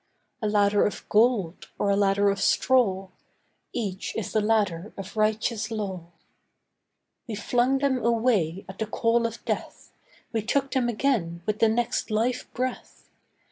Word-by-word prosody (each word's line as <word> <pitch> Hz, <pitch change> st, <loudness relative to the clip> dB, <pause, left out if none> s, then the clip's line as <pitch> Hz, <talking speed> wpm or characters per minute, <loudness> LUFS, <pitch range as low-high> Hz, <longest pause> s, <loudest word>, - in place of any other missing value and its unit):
A 215 Hz, -, 0 dB
ladder 205 Hz, -1 st, +3 dB
of 205 Hz, -, -3 dB
gold, 210 Hz, -6 st, +2 dB
or 200 Hz, -, +1 dB
a -, -, +3 dB
ladder 200 Hz, 0 st, +3 dB
of 195 Hz, 0 st, -3 dB
straw, 195 Hz, -9 st, +2 dB, 0.6 s
Each 195 Hz, -4 st, -4 dB
is 220 Hz, -, -3 dB
the 215 Hz, -, +2 dB
ladder 210 Hz, -4 st, 0 dB
of 195 Hz, +1 st, -8 dB
righteous 215 Hz, +1 st, 0 dB
law. 195 Hz, -6 st, -4 dB, 1.2 s
We 225 Hz, -, -4 dB
flung 245 Hz, +5 st, +1 dB
them 265 Hz, -3 st, 0 dB
away 220 Hz, -7 st, +1 dB
at 190 Hz, -, -10 dB
the 220 Hz, -, -1 dB
call 230 Hz, +1 st, +1 dB
of 230 Hz, 0 st, -10 dB
death, -, -, -4 dB, 0.4 s
We 225 Hz, -, +1 dB
took 270 Hz, +5 st, 0 dB
them 250 Hz, -2 st, +1 dB
again 210 Hz, -9 st, -1 dB
with 215 Hz, 0 st, -1 dB
the 225 Hz, -, +5 dB
next 240 Hz, +2 st, 0 dB
life 230 Hz, +4 st, -1 dB
breath. 255 Hz, +1 st, -5 dB
215 Hz, 150 wpm, -26 LUFS, 200-235 Hz, 1.2 s, the